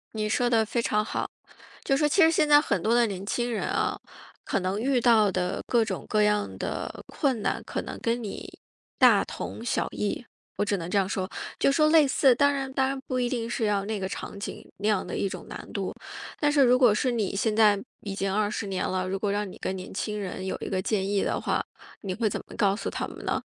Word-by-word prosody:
你 215 -1 -1
说 245 +2 +2
得 230 -2 +3
非 230 +2 -2
常 215 -2 +1
好， - - -3 0.6
就 275 - +2
说 300 0 +3
其 370 - +3
实 320 - +7
现 310 -2 +3
在 295 0 +7
很 200 - -1
多 225 - +2
的 240 -1 +4
年 195 -1 -5
轻 240 +3 -1
人 220 - -2
啊， - - 0 0.5
可 - - -1
能 190 +3 -1
遇 255 +1 +1
到 220 -4 +5
的 180 0 -1
各 235 -2 +3
种 - - -4
各 215 -1 +2
样 210 0 +1
的 - - -4
困 265 -8 0
难 - - -1
可 - - -3
能 - - -7
跟 235 +1 -1
你 205 - -6 0.5
大 - - +6
同 230 - -6
小 - - 0
异， 210 +3 -2 0.3
我 - - +1
只 205 -1 0
能 170 -2 -5
这 200 +1 +2
样 190 0 0
说。 185 -2 -2 0.3
就 275 - +4
说 305 +2 +4
类 310 -3 +6
似 265 -2 +4
当 285 +2 +4
然 270 -1 -3
当 265 -1 +2
然 270 0 -2
不 255 -1 -1
一 245 - +1
定 235 -2 -2
是 230 - -1
要 205 -2 +1
那 215 -1 -2
个 190 - -2
场 200 - -6
景， - - -6
那 205 +2 -2
样 210 -3 +2
的 - - -4
一 - - 0
种 185 -2 -7
难 - - -8
度。 195 -3 -2 0.5
但 295 -1 +3
是 290 -1 +4
如 250 0 +5
果 245 -5 +5
是 250 +4 +1
你 215 -4 -1
现 215 +1 +1
在 210 -3 +5 0.2
已 200 - -5
经 195 0 -1
20 210 0 -1
年 190 -1 -1
了， 185 0 -1
如 195 +1 -1
果 200 0 -1
让 205 -1 -2
你 - - -11
跟 190 - -2
年 185 -1 -7
轻 210 +2 -3
人 190 -1 -5
有 190 - -2
一 - - -4
个 190 - 0
建 195 -1 0
议 200 -1 +1
的 - - -1
话， - - 0 0.4
你 190 -2 -3
会 220 +1 0
怎 - - -3
么 - - -11
告 200 -1 +2
诉 210 - -5
他 - - -3
们 - - -10
呢？ - - 0
215 Hz, 270 characters per minute, -27 LUFS, 195-245 Hz, 0.6 s, 实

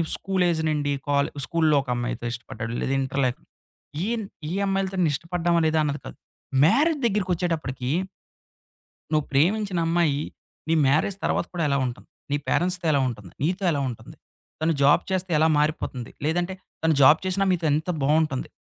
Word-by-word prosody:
School 190 -1 -1
age 160 -1 0
నుండి 145 -2 0 0.2
కాలే 140 0 +2 0.2
స్కూలులో 160 -3 +2
ఒక - - -11
అమ్మాయితో 120 0 -3
ఇష్టపడ్డాడు. 115 -1 -6
లేదా 135 - -1
ఇంటర్ 135 +1 -1
లే 130 - +3 0.8
ఈన్ 230 -2 -2 0.3
ఈ - - -2
అమ్మాయిలతోన్న 190 -2 0
ఇష్టపడ్డామా 170 +2 0
లేదా 155 0 +2
అన్నది 145 0 -2
కాదు. - - -9 0.5
మ్యారేజ్ 300 - +3
దగ్గరకొచ్చేటప్పటికి. 175 - -1 1.2
నువ్వు 155 -2 +2
ప్రేమించిన 185 +6 +2
అమ్మాయి. 165 -4 +1 0.5
నీ 165 - +3
మ్యారేజ్ 155 +8 +2
తర్వాత - - 0
కూడా 170 - -1
ఎలా 140 -1 +2
ఉంటుంది? 120 - -7 0.2
నీ 145 - +2
పేరెంట్స్‌తో 180 -1 +1
ఎలా 140 - +3
ఉంటుంది? 105 -7 -8
నీతో 180 +6 0
ఎలా 145 - 0
ఉంటుంది? 120 - -9 0.4
తను 160 +1 +2
జాబ్ 145 +5 +5
చేస్తే 185 -1 -1
ఎలా 160 +1 +4
మారిపోతుంది? 150 -5 -1
లేదంటే 175 +4 0 0.3
తను 160 -1 +3
జాబ్ 150 +3 +7
చేసినా 185 +1 +1
మీతో 170 -2 -1
ఎంత 160 +4 0
బావుంటుంది? 150 -1 +1
160 Hz, 155 wpm, -25 LUFS, 140-180 Hz, 1.2 s, జాబ్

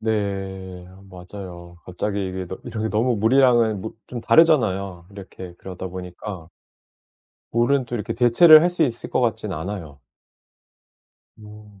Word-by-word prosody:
네, 95 -4 -3 0.2
맞아요. 90 -2 -10
갑자기 100 +2 -3
이게 95 0 -5
너 95 - -7
이런 110 -3 -5
게 110 - -1
너무 115 +3 +1
무리하면 115 -2 +3
뭐 110 - -7
좀 120 - -6
다르잖아요. 100 - +2
이렇게 95 -3 -10
그러다 95 0 -7
보니까 90 -1 -8 1.0
물은 125 +3 +2
또 120 - -6
이렇게 115 +1 -4
대체를 140 +7 +7
할 175 - +3
수 175 -1 0
있을 120 -6 -2
것 - - +1
같지는 110 -6 -1
않아요. 80 -4 -6 1.4
음. 105 -1 -15
105 Hz, 285 characters per minute, -22 LUFS, 95-115 Hz, 1.4 s, 대체를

